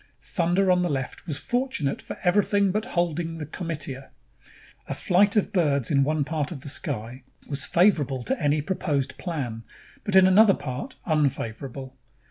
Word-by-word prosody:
Thunder 180 +2 +1
on 180 0 +3
the 175 - 0
left 135 +2 -4
was 150 -4 -1
fortunate 245 - -1
for - - -8
everything 200 +1 +3
but 215 +3 -1
holding 170 -1 -1
the 155 - -5
comitia. 150 -5 -5 0.8
A - - -3
flight 200 +3 +3
of 210 0 +1
birds 145 - +1
in 140 -2 +4
one 155 +1 +1
part 150 0 -2
of 145 -6 -7
the 145 - -7
sky 130 - -3 0.3
was 140 -1 +2
favorable 145 -9 +2
to 265 - -2
any 145 0 +1
proposed 145 -6 -1
plan, 135 -11 -4 0.4
but 205 - -2
in 190 -1 +8
another 195 +2 +6
part, 145 - -6
unfavorable. 135 -3 -2
155 Hz, 160 wpm, -25 LUFS, 140-185 Hz, 0.8 s, in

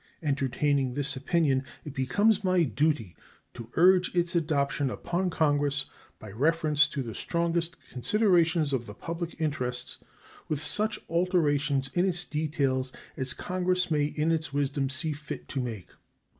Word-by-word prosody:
Entertaining 140 -1 +1
this 145 0 0
opinion, 140 -1 +1 0.2
it 150 - -6
becomes 205 +11 +2
my 185 -2 +3
duty 145 - 0 0.4
to 115 -2 -9
urge 180 +2 +5
its 175 0 +1
adoption 145 -4 +1
upon 180 +7 -2
Congress 145 -3 +1 0.3
by 110 - -10
reference 155 - +3
to 140 - -4
the 115 -2 -6
strongest 170 +3 -1 0.2
considerations 170 - +2
of 120 -3 -1
the 105 - -9
public 170 - -5
interests, 130 -6 -3 0.5
with 155 - -1
such 210 +7 -1
alterations 150 -6 +1
in 175 - +2
its 175 -1 -1
details 140 -4 -1 0.2
as 130 -1 -2
Congress 180 -1 0
may 150 -2 +3
in 150 +2 0
its 160 -3 -1
wisdom 140 -1 0
see 145 +4 0
fit 150 +1 -7
to 140 - -2
make. 115 -7 -5
150 Hz, 145 wpm, -28 LUFS, 135-170 Hz, 0.5 s, urge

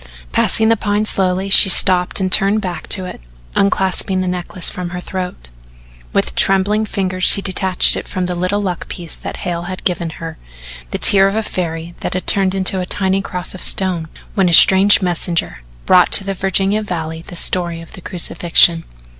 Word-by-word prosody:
Passing 220 - +1
the 230 - +3
Pine 205 +1 -2
slowly, 190 -1 -1
she 195 - +8
stopped 180 0 +2
and 185 -1 -2
turned 200 +2 +4
back 180 -5 -6
to 190 -2 0
it, 180 - -10 0.3
unclasping 190 -1 0
the 185 - -3
necklace 180 0 -4
from 180 -1 -2
her 180 +1 -7
throat. 180 - -7 0.6
With - - -1
trembling 200 - 0
fingers 185 -2 -4
she - - +7
detached 190 -1 +2
from 185 -2 -4
it - - -1
the 180 - -3
little 185 +4 -2
luck 180 -3 -5
piece 170 -3 -7
that - - -8
Hale 170 -1 -3
had 185 - -8
given 175 -2 -2
her 165 -1 -9 0.5
the - - -4
tear 195 -1 +5
of 195 - -3
a 220 - -1
fairy 170 -3 -5
that - - -5
had 185 - -4
turned 195 -1 +1
into 190 0 +1
a 180 - -3
tiny 190 0 -1
cross 180 -2 -5
of 185 - -9
stone 180 -4 0 0.3
when 190 -3 +1
a - - -1
strange 195 +4 +6
messenger 170 - -2 0.2
brought 180 -1 +3
to - - +6
the 195 0 -4
Virginia 195 +2 0
valley 165 -5 -6
the - - -8
story 170 -1 0
of 165 - -13
the 185 - -10
crucifixion. 170 -2 +2
185 Hz, 190 wpm, -16 LUFS, 175-195 Hz, 0.6 s, she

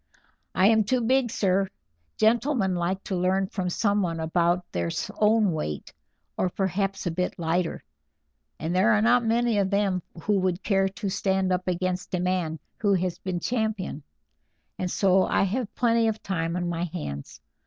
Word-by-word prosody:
"I 185 - +4
am 220 +1 +5
too 250 +4 +1
big, 255 +1 +2
sir; 195 -3 +1 0.5
gentlemen 225 -2 +2
like 180 +2 -1
to 195 - -3
learn 185 +2 +1
from 185 -1 -3
someone 195 -4 0
about 170 +2 +1
their 85 -1 -1 0.3
own 215 -2 +4
weight, 75 - -4 0.4
or 185 - +1
perhaps 195 +1 -1
a 175 - 0
bit 180 +2 -2
lighter, 170 +1 -1 0.8
and 165 +3 -2
there 210 +5 +4
are 210 - +3
not 240 +1 +4
many 230 -1 +2
of 195 -1 +1
them 200 -2 +1 0.2
who 205 -2 +2
would 185 0 -1
care 195 -2 +2
to 200 +1 -4
stand 190 -1 +1
up 180 0 -2
against 185 +1 -1
a - - -1
man 180 -3 -1 0.2
who 200 -3 +3
has 180 -1 -2
been 185 -2 -3
champion, 220 - -2 0.8
and 185 - -1
so 190 0 +3
I - - +2
have 215 +3 -2
plenty 230 -1 +3
of 220 -1 -2
time 165 -3 -2
on 180 -1 -1
my 170 0 -1
hands. 150 - -6
190 Hz, 170 wpm, -26 LUFS, 180-210 Hz, 0.8 s, am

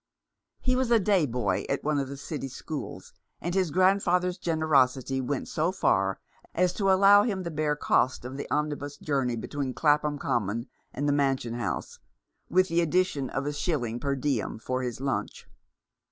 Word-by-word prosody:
He 255 -1 +1
was 255 -1 0
a 235 - +6
day 195 -6 +2
boy 115 -6 -1
at 140 - -1
one 150 -1 +1
of 135 - -2
the 140 +1 -7
City 140 0 -5
schools, 145 +3 -7 0.3
and 175 - -3
his 185 -3 +1
grandfather's 180 +1 +2
generosity 135 -6 +2
went 130 +1 -3
so 160 +3 0
far 95 - +1 0.4
as 180 +1 +2
to 195 -1 +2
allow 200 +2 +7
him 200 -4 -1
the 170 - -4
bare 150 -1 0
cost 130 -3 +1
of 130 +2 -6
the 140 - -6
omnibus 145 -1 -2
journey 135 -6 -1
between 130 +3 -4
Clapham 150 -1 +2
Common 115 -3 -1 0.3
and 145 - -2
the 145 - +3
Mansion 135 -4 0
House, 120 -5 -4 0.5
with 185 +2 +3
the 170 0 +2
addition 165 -5 +1
of 135 +1 -3
a 145 - -2
shilling 125 -7 -2
per 140 0 -1
diem 135 -5 -1
for 130 +3 -3
his 125 -2 -4
lunch. 135 0 -3
145 Hz, 175 wpm, -27 LUFS, 130-175 Hz, 0.5 s, allow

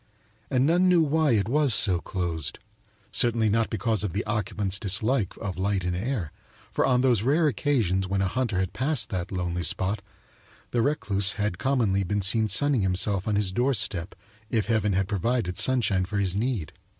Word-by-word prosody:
And 130 0 +2
none 175 +4 +3
knew 175 -2 +5
why 155 -2 +2
it 105 -2 +1
was 140 -1 +2
so 90 -3 +2
closed; 85 -6 -4 0.5
certainly 115 -3 +2
not 115 +2 +1
because 110 -2 -1
of 100 -5 -3
the 100 - -2
occupant's 100 -2 -2
dislike 105 +2 0
of 95 -4 -5
light 95 -1 0
and 90 0 -1
air, 100 - -3 0.4
for - - +1
on 125 -2 +3
those 125 -5 +3
rare 150 +7 +2
occasions 105 - 0
when 100 +1 -1
a 95 - +1
hunter 120 -2 -1
had 95 -1 -1
passed 130 -2 0
that 90 -2 -3
lonely 90 -2 -2
spot 95 +5 -1 0.7
the 120 - +1
recluse 100 -8 +1
had 105 -4 -2
commonly 115 -8 +1
been 100 +2 -1
seen 110 +3 +3
sunning 135 +4 +3
himself 95 +1 0
on 105 - +1
his 100 -2 0
doorstep 110 -6 -1 0.3
if 110 -3 0
heaven 105 -2 +1
had 95 0 0
provided 105 -1 -1
sunshine 110 -8 +2
for 100 +3 -4
his 95 -2 0
need. 110 -6 -2
105 Hz, 180 wpm, -26 LUFS, 95-125 Hz, 0.7 s, knew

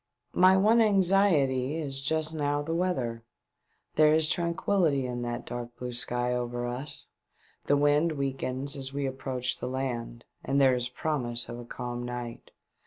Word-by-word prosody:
My 185 +1 +6
one 220 +4 +5
anxiety 180 - +3
is 140 -4 -2
just 160 +2 0
now 145 -1 0
the 165 +2 -3
weather. 130 -10 -1 0.7
There 155 0 +6
is 160 -1 +3
tranquihty 170 -3 +1
in 120 -1 -4
that 120 0 -4
dark 120 0 -6
blue 125 0 -5
sky 120 +1 0
over 120 0 -2
us; 125 +5 -5 0.6
the 145 - +4
wind 145 +3 +3
weakens 135 0 -1
as 135 -1 -4
we 140 0 -2
approach 130 -1 -3
the - - -4
land, 120 -3 -4 0.2
and 140 +1 +1
there 135 -2 +5
is 125 0 -1
promise 125 -4 -2
of 120 - -6
a 120 - -8
calm 120 0 -5
night. 120 -1 -6
135 Hz, 160 wpm, -28 LUFS, 125-155 Hz, 0.7 s, My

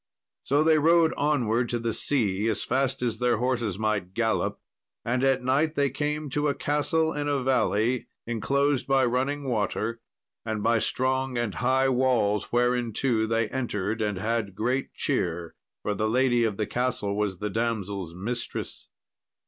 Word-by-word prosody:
So 145 +3 +2
they 160 -1 +4
rode 165 +1 +4
onwards 125 -5 +1
to - - +2
the 115 -1 -2
sea 105 -7 +1
as 110 - -1
fast 135 0 0
as 115 -2 -1
their 125 -2 +2
horses 120 -5 -1
might 105 -4 -1
gallop, 115 -1 0 0.5
and 125 +2 0
at 135 -1 +2
night 145 +5 +1
they 140 -2 +1
came 150 +2 -2
to 150 +2 0
a 140 - 0
castle 160 +2 0
in 145 0 -2
a 140 -2 0
valley, 120 -1 +1 0.2
inclosed 135 +4 0
by 135 -1 +3
running 135 +4 0
water, 115 0 -1 0.4
and 110 -2 -3
by 115 0 +3
strong 130 +2 0
and 120 -4 -1
high 130 +2 +2
walls, 120 -5 +1
whereinto 120 -1 +1
they 115 0 +1
entered 110 -4 -2
and 105 -2 -1
had 105 -1 -2
great 125 +6 -1
cheer, 85 -1 -1 0.3
for 105 - 0
the 110 +2 -1
lady 120 0 +3
of 105 -3 -2
the 105 - 0
castle 110 -3 -1
was 105 -3 -1
the 105 +2 -3
damsel's 100 -6 -2
mistress. 115 +6 -5
120 Hz, 160 wpm, -26 LUFS, 110-135 Hz, 0.5 s, they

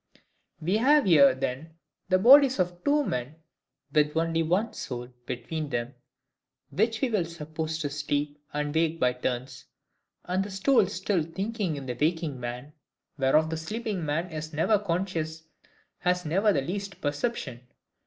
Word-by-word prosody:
We 175 +6 +1
have 285 +3 +4
here, 140 -7 +6
then, 135 +5 -4 0.3
the 185 - +5
bodies 265 +6 +7
of 180 -1 -2
two 290 0 +2
men 125 - -3 0.6
with 150 0 +2
only 165 0 +1
one 185 +8 0
soul 125 -1 -6 0.2
between 145 +5 -4
them, 120 0 -3 0.8
which 220 +2 0
we 265 - +2
will 200 -6 +1
suppose 160 -1 -5
to 150 -3 -3
sleep 145 0 -2
and 150 0 -2
wake 165 0 +1
by 125 0 +3
turns; 125 0 -4 0.6
and 185 +2 0
the 200 - -7
soul 205 +2 +3
still 200 -2 -1
thinking 195 +2 -3
in 140 -2 -6
the 125 - -3
waking 160 -3 0
man, 125 +4 -6 0.5
whereof 155 +4 +3
the 160 - -2
sleeping 210 +2 -4
man 160 +4 -2
is 155 0 -6
never 195 +8 +3
conscious, 170 -4 -2 0.6
has 180 0 0
never 195 +7 +3
the 140 - +1
least 190 +5 -5
perception. 145 - -3
160 Hz, 155 wpm, -27 LUFS, 145-195 Hz, 0.8 s, bodies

